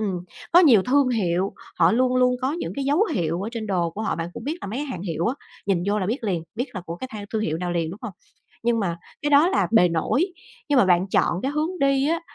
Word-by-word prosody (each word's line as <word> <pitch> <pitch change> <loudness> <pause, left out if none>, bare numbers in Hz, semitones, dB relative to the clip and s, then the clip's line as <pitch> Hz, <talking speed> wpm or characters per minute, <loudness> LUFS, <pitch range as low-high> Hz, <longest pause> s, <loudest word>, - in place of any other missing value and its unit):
Ừm, 195 -5 -2 0.3
có 350 - +8
nhiều 250 - +6
thương 270 +4 +3
hiệu, 190 -5 0 0.3
họ 170 0 +5
luôn 255 +2 +2
luôn 250 0 +3
có 265 +2 +1
những 340 +2 -4
cái 280 - -2
dấu 295 +9 +3
hiệu 170 0 -1
ở 210 - -3
trên 225 -2 -4
đồ 175 -4 0
của 205 +6 -6
họ, 220 - -1
bạn 165 0 -3
cũng - - -8
biết 310 +5 -3
là - - -4
mấy 220 +6 -4
cái 295 - -3
hàng 185 -11 -5
hiệu 170 -2 -2
á 240 - 0 0.3
nhìn 190 -4 +1
vô 205 +1 +1
là 190 - -1
biết 230 +4 -2
liền, 180 -5 -1
biết 245 +4 -1
là 185 - -4
của 170 - -5
cái 260 - -6
thang 205 -1 -6
thương 220 -1 0
hiệu 160 -5 -1
nào 175 0 -2
liền, 165 -2 -1
đúng 190 - -9
hông? 225 -5 -5 0.5
Nhưng 235 -1 +2
mà 175 -5 -1 0.3
cái 295 - 0
đó 295 +4 +6
là 385 - +1
bề 200 -6 +6
nổi, 170 - +1 0.4
nhưng 290 -2 +4
mà 245 - +6
bạn 180 0 +3
chọn 180 -1 +1
cái 270 - -1
hướng 315 +5 -2
đi 275 0 +3
á 335 +1 0
220 Hz, 280 wpm, -24 LUFS, 180-275 Hz, 0.5 s, có